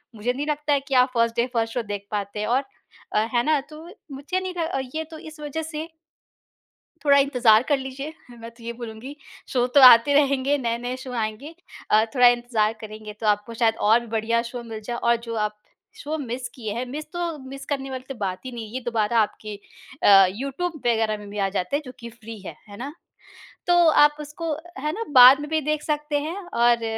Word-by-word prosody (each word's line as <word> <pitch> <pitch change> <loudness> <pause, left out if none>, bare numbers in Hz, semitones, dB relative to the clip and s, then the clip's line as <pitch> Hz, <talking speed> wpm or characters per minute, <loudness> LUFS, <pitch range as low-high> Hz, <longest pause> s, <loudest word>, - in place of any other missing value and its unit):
मुझे 230 +4 -1
नहीं 285 +3 -3
लगता 295 0 0
है 280 - +3
कि 275 - -4
आप 250 +1 +5
फर्स्ट 230 0 +2
डे 235 - +2
फर्स्ट 225 -1 -1
शो 245 - -1
देख 205 -1 -6
पाते 205 0 -3
हैं। 210 - -2
और 255 +4 +2 0.5
अ, - - +3
है 240 - +3
ना? 305 0 +2
तो 305 +3 -13 0.3
मुझे 285 +7 -3
नहीं 375 -1 -4 0.4
ये 320 - -1
तो 315 - -8
इस 310 0 -11
वजह 300 +2 -4
से 315 0 -6 1.2
थोड़ा 280 -1 +6
इंतजार 245 -5 +4
कर 290 - +4
लीजिए 270 +3 -6 0.3
मैं 230 0 -8
तो 235 0 -19
ये 235 - -4
बोलूँगी 235 +4 -9 0.3
शो 245 -2 +1
तो 280 - +8
आते 250 +2 +8
रहेंगे, 280 0 +3
नए-नए 245 +1 -2
शो 260 -1 -9
आएँगे। 230 +7 -4 0.4
अ, 215 +1 +5
थोड़ा 250 -2 +6
इंतजार 240 -3 +2
करेंगे 215 -1 -9
तो 220 - -2
आपको 210 +2 0
शायद 225 -1 +2
और 225 +2 +6
भी 235 - -10
बढ़िया 230 +1 +1
शो 240 +1 -7
मिल 225 -2 -7
जाए। 240 +1 -4
और 235 0 +2
जो 230 - -4
आप 210 0 -9 0.4
शो 305 +2 -4
मिस 245 -2 -5
किए 220 -5 -5
हैं 245 +2 -2
मिस 295 +5 -6
तो 345 -3 -3
मिस 275 +1 -8
करने 270 -2 -3
वाली 260 -1 -6
तो 270 - -5
बात 195 -5 -4
ही 255 - -5
नहीं 225 -2 -7
ये 255 - -2
दोबारा 230 -1 0
आपके 215 0 -3 0.5
अ, 195 -1 +8
यूट्यूब 275 - -4
वग़ैरह 225 -2 +1
में 205 -1 -11
भी 210 - -7
आ 195 -1 +1
जाते 195 +7 -1
हैं 300 - -3
जो 255 - -8
कि 235 -1 -8
फ्री 225 -1 -11
हैं। 195 - -9
है 205 - -10
ना? 265 +7 -6 0.8
तो 350 - +4
आप 295 -1 +5
उसको 300 +2 -4 0.3
है 300 +3 -2
ना 450 - -3 0.2
बाद 255 +3 +10
में 295 +1 -6
भी 315 -1 +1
देख 305 +1 -1
सकते 300 -1 -1
हैं 320 +5 -4 0.2
और 235 -1 +3
245 Hz, 220 wpm, -24 LUFS, 225-290 Hz, 1.2 s, बाद